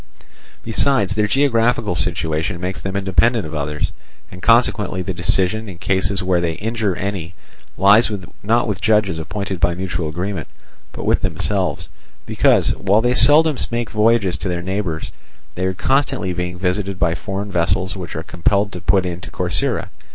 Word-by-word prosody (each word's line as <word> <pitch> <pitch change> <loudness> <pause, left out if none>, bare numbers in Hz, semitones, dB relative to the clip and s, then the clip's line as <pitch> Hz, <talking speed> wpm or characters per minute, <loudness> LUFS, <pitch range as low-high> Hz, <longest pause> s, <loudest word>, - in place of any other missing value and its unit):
Besides, 110 -2 +1
their 105 0 +1
geographical 115 -4 +2
situation 85 +1 -1
makes 90 +2 -4
them 95 0 -4
independent 100 +3 +2
of 80 - -7
others, 75 0 -2 0.4
and 90 - -10
consequently 105 -4 +2
the 95 - -3
decision 95 +5 +1
in 90 - -9
cases 95 +1 0
where 90 -1 +1
they 85 -1 -1
injure 110 0 -2
any 95 -2 -4 0.4
lies 105 +4 +5 0.3
not 115 +4 +1
with 100 -4 -3
judges 105 -6 +2
appointed 95 +2 -4
by 85 +1 +2
mutual 90 -3 -3
agreement, 90 +1 -4 0.4
but - - -7
with - - +2
themselves, 95 -7 -1 0.4
because, - - +3
while 100 +3 +2
they 120 +1 +2
seldom 150 +2 +5
make 120 -1 -3
voyages 105 -4 +2
to 95 - -4
their 85 -1 -3
neighbours, 95 -4 -3 0.4
they 90 +1 -1
are 95 - -2
constantly 130 -7 0
being 90 0 -4
visited 95 +1 -1
by 90 -2 +1
foreign 100 +3 -5
vessels 95 +2 0
which 90 -2 -7
are 80 - -4
compelled 100 +4 0
to 90 - -7
put 95 0 +2
in 90 0 -4
to - - -9
Corcyra. - - -1
95 Hz, 165 wpm, -19 LUFS, 90-105 Hz, 0.4 s, lies